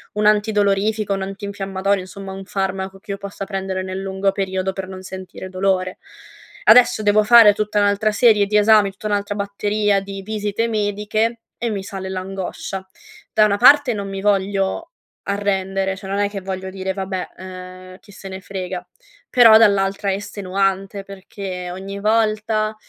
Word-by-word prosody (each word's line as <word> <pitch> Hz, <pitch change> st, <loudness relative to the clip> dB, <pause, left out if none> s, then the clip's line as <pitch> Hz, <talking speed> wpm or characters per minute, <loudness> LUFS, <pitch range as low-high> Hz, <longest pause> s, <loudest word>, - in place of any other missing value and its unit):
un 210 Hz, -, 0 dB
antidolorifico, 210 Hz, 0 st, +2 dB
un 195 Hz, -, -3 dB
antinfiammatorio 195 Hz, 0 st, -2 dB
insomma 190 Hz, +1 st, -8 dB
un 195 Hz, 0 st, -7 dB
farmaco 195 Hz, 0 st, -3 dB
che 210 Hz, 0 st, -9 dB
io 200 Hz, -, -3 dB
possa 195 Hz, 0 st, -7 dB
prendere 190 Hz, -1 st, -3 dB
nel 190 Hz, +1 st, -5 dB
lungo 195 Hz, 0 st, 0 dB
periodo 190 Hz, -1 st, -2 dB
per 190 Hz, -1 st, -5 dB
non 185 Hz, -1 st, -8 dB
sentire 185 Hz, 0 st, -8 dB
dolore. 185 Hz, -1 st, -1 dB, 0.7 s
Adesso 235 Hz, 0 st, +6 dB
devo 210 Hz, +1 st, +4 dB
fare 225 Hz, -2 st, +8 dB
tutta 210 Hz, 0 st, -1 dB
un'altra 205 Hz, +1 st, +2 dB
serie 210 Hz, -2 st, +4 dB
di 210 Hz, +1 st, +2 dB
esami, 210 Hz, -1 st, +5 dB
tutta 205 Hz, +2 st, -7 dB
un'altra 205 Hz, 0 st, -1 dB
batteria 205 Hz, 0 st, 0 dB
di 195 Hz, 0 st, -7 dB
visite 215 Hz, +1 st, -2 dB
mediche 215 Hz, +2 st, -1 dB, 0.2 s
e 235 Hz, -, -2 dB
mi 200 Hz, -3 st, -3 dB
sale 190 Hz, -1 st, -6 dB
l'angoscia. 190 Hz, 0 st, -5 dB, 0.5 s
Da 215 Hz, -1 st, +5 dB
una 200 Hz, -1 st, +2 dB
parte 280 Hz, 0 st, +6 dB
non 200 Hz, -1 st, -4 dB
mi 195 Hz, 0 st, -5 dB
voglio 195 Hz, -1 st, 0 dB, 0.4 s
arrendere, 195 Hz, -1 st, -1 dB
cioè 190 Hz, 0 st, -9 dB
non 200 Hz, +1 st, -1 dB
è 205 Hz, 0 st, +1 dB
che 200 Hz, -2 st, -6 dB
voglio 190 Hz, 0 st, -5 dB
dire: 190 Hz, 0 st, -4 dB
"Vabbè, 190 Hz, -1 st, -4 dB
ehm, 185 Hz, 0 st, -10 dB
chi 205 Hz, -, -18 dB
se 195 Hz, 0 st, -11 dB
ne 190 Hz, 0 st, -7 dB
frega" 185 Hz, -2 st, -5 dB, 0.4 s
però 230 Hz, -4 st, +8 dB
dall'altra 200 Hz, -2 st, +2 dB
è 190 Hz, -, 0 dB
estenuante 195 Hz, 0 st, -2 dB
perché 190 Hz, -2 st, -7 dB
ogni 195 Hz, +2 st, -7 dB
volta, 215 Hz, 0 st, +1 dB
195 Hz, 165 wpm, -20 LUFS, 190-210 Hz, 0.7 s, fare